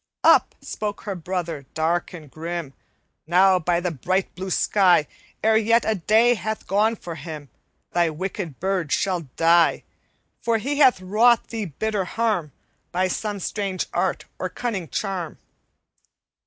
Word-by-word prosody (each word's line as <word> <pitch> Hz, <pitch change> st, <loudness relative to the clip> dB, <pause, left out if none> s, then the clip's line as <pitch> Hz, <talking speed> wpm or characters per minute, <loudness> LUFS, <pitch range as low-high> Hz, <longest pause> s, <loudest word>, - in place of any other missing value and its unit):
"Up -, -, +5 dB
spoke 210 Hz, -1 st, -4 dB
her 205 Hz, -, -4 dB
brother, 170 Hz, -5 st, -4 dB
dark 165 Hz, +2 st, 0 dB
and 155 Hz, -6 st, -11 dB
grim: 165 Hz, -3 st, -5 dB, 0.5 s
'Now 185 Hz, +2 st, +5 dB
by 170 Hz, +1 st, +1 dB
the 175 Hz, 0 st, -2 dB
bright 185 Hz, +7 st, -1 dB
blue 190 Hz, +1 st, -6 dB
sky, 185 Hz, -5 st, +3 dB, 0.4 s
E'er 220 Hz, 0 st, +5 dB
yet 230 Hz, +2 st, +3 dB
a 220 Hz, -, +2 dB
day 220 Hz, +5 st, +4 dB
hath 220 Hz, 0 st, -4 dB
gone 215 Hz, +3 st, +2 dB
for 175 Hz, -5 st, -8 dB
him 155 Hz, -4 st, -8 dB, 0.4 s
Thy 170 Hz, -1 st, +2 dB
wicked 175 Hz, -1 st, -5 dB
bird 185 Hz, -5 st, -1 dB
shall 185 Hz, -3 st, +1 dB
die! 165 Hz, 0 st, +4 dB, 0.6 s
For 230 Hz, -1 st, +1 dB
he 280 Hz, +6 st, -2 dB
hath 260 Hz, -9 st, +5 dB
wrought 225 Hz, +6 st, +3 dB
thee 225 Hz, -2 st, -3 dB
bitter 195 Hz, +5 st, -2 dB
harm, 210 Hz, -7 st, -1 dB, 0.4 s
By 185 Hz, +1 st, +1 dB
some 205 Hz, +2 st, -3 dB
strange 195 Hz, 0 st, -2 dB
art -, -, -1 dB
or -, -, -2 dB
cunning 200 Hz, -, -4 dB
charm.' 185 Hz, -1 st, -3 dB
185 Hz, 145 wpm, -23 LUFS, 170-215 Hz, 0.6 s, Up